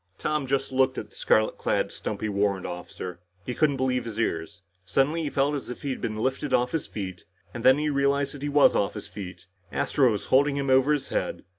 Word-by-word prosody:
Tom 150 -3 -1
just 135 +1 0
looked 130 0 +2
at - - -6
the - - -18
scarlet 110 0 +2
clad, - - 0
stumpy 110 - -4
warrant 100 -2 0
officer. 90 0 -6 0.3
He 125 - -3
couldn't 145 0 +2
believe 125 -1 0
his 115 -1 -5
ears. 95 -1 -2 0.2
Suddenly 140 - +1
he 150 - -2
felt 140 +1 +1
as 140 -4 -4
if 125 - -7
he 140 - -1
had - - -5
been 110 - -2
lifted 130 +5 0
off 125 +1 +1
his 160 - -2
feet. 95 -3 -6 0.3
And 120 - -6
then 130 +1 +7
he 150 +1 0
realized 140 0 +1
that 145 - -9
he 145 - -2
was 145 0 +5
off 100 - 0
his - - -7
feet. 90 -3 -9 0.3
Astro 135 -4 +2
was 105 - -3
holding 140 +1 +4
him 140 -1 0
over 130 +2 +5
his 150 -2 0
head. - - -2
130 Hz, 230 wpm, -26 LUFS, 105-140 Hz, 0.3 s, then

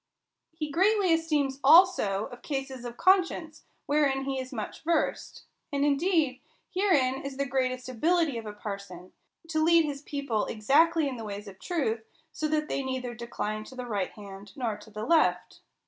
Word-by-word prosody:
He 310 -2 -5
greatly 385 +2 +3
esteems 300 -5 0
also 275 - +5
of 245 - -11
cases 270 -3 -4
of 240 0 -7
conscience; 350 -4 +2 0.2
wherein 280 -2 +2
he 270 -1 -2
is 260 0 -6
much 220 -5 -6
versed. 330 -1 -1 0.3
And 280 0 +1
indeed, 290 -2 +1 0.3
herein 290 -10 +2
is 275 -1 -6
the 280 - 0
greatest 255 -1 -1
ability 305 +1 +1
of 220 - -9
a 210 - -6
parson; 200 -3 -8 0.3
to 315 -1 0
lead 335 0 +5
his 280 -2 -4
people 280 -7 -2
exactly 300 +8 +3
in 260 -2 -4
the 225 - -6
ways 205 0 -6
of 190 -1 -11
truth, 270 -11 -1 0.3
so 310 - -2
that 305 0 0
they 275 - -1
neither 260 -2 -3
decline 225 -3 -4
to 260 - -12
the 250 -1 -5
right 205 -6 -2
hand 200 -1 -11
nor 235 -5 -2
to 220 - -14
the 215 +1 -6
left. 320 +4 +2
270 Hz, 175 wpm, -28 LUFS, 230-315 Hz, 0.3 s, also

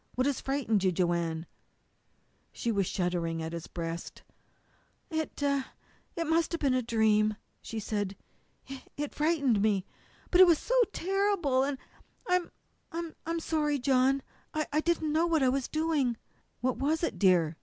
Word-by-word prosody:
"What 255 - +1
has 280 -2 0
frightened 260 -7 0
you, 185 - +3
Joanne?" 170 -2 0 1.1
She 235 - -2
was 200 -4 +1
shuddering 175 -3 -1
against 160 +1 -5
his 170 -1 -5
breast. 165 -1 -6 0.9
"It 315 -1 -3
it 280 +4 -3
must 325 +1 +2
have 335 - -1
been 275 -3 +3
a 255 - +2
dream," 215 -2 +2 0.3
she 225 - -5
said. 205 -2 -2 0.5
"It 270 0 -8 0.2
it 295 0 -3
frightened 285 -9 +2
me. 200 -3 +2 0.5
But 360 - +7
it 370 - +10
was 335 -2 +5
so - - -3 0.2
terrible, 385 -9 +1
and 275 0 0 0.5
I'm 360 -1 +1 0.4
I'm 335 0 -4
sorry, 300 -3 0
John. 265 +1 +2 0.3
I 305 -1 0
didn't 315 -2 0
know 325 +2 +3
what 325 -4 +2
I 260 - +4
was 265 0 0
doing." 310 -7 0 0.4
"What 255 +1 0
was 310 +4 0
it, - - -1
dear?" 175 -5 +4
270 Hz, 155 wpm, -30 LUFS, 205-315 Hz, 1.1 s, it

